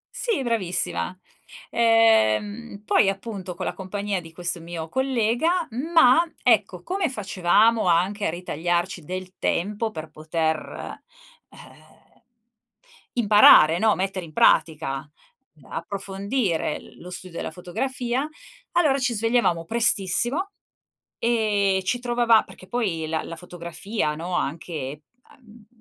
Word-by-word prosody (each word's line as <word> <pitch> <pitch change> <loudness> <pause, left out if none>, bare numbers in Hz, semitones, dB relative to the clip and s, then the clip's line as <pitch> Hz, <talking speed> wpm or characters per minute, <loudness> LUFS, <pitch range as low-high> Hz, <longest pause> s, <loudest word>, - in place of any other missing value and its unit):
Sì, 440 - -1
bravissima. 185 - -2 0.5
Ehm, 225 - +2
poi 195 - +4
appunto 195 -2 -6
con - - -5
la - - -2
compagnia 200 0 -3
di 165 -1 -13
questo 175 +1 -3
mio 165 -1 -6
collega, 265 - 0
ma 315 +3 +4 0.2
ecco, 200 -7 +2
come 370 -3 -1
facevamo 210 0 +2
anche 185 +5 +1
a - - 0
ritagliarci 175 0 -2
del 185 +3 -7
tempo 210 +5 -1
per 160 -6 -8
poter, 160 0 -3 0.5
e - - -18
ehm, - - -19 0.9
imparare, 205 -8 +7
no, 220 +1 +3
mettere 190 -1 -3
in 155 - -16
pratica, 150 -4 +3 0.7
a - - -7
approfondire 195 - -3
lo 180 - -11
studio 180 -1 -8
della - - -4
fotografia. 245 - -3 0.4
Allora 300 -6 +3
ci 255 -3 0
svegliavamo 225 -6 +1
prestissimo 235 - +1 0.7
e 210 -4 +1
ci 245 - 0
trovava 240 -2 +3
perché 185 - -15
poi 190 -10 -1
la 160 0 -1
la 165 - -8
fotografia, 175 +1 -4
no, 175 +3 -5
anche 150 -3 -4 0.2
am 225 -3 -19
200 Hz, 120 wpm, -24 LUFS, 170-235 Hz, 0.9 s, imparare